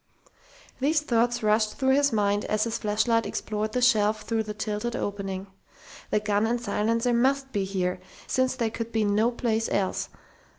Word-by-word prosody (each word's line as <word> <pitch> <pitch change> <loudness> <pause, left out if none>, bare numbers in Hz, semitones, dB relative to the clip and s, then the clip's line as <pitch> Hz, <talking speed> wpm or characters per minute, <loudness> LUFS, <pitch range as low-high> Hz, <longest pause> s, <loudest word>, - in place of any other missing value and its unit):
These 295 +3 +2
thoughts 240 -3 +1
rushed 215 0 +2
through 265 -1 +2
his 285 0 +3
mind 205 -1 +1
as 215 0 +1
his 230 -1 -2
flashlight 220 +2 +1
explored 215 0 -3
the 250 - 0
shelf 215 -3 +3
through 225 -1 0
the 215 -1 -5
tilted 215 +3 -3
opening. 195 -3 -3 0.6
The - - +2
gun 210 +1 +1
and 240 +1 0
silencer 230 +2 0
must 265 +3 +1
be 200 -5 -1
here, 185 -2 -2 0.3
since 260 0 +1
they 230 -3 -1
could 230 0 -5
be 220 -2 +1
no 210 +3 +3
place 225 -2 -1
else!... 195 -2 -1
220 Hz, 170 wpm, -26 LUFS, 210-240 Hz, 0.6 s, his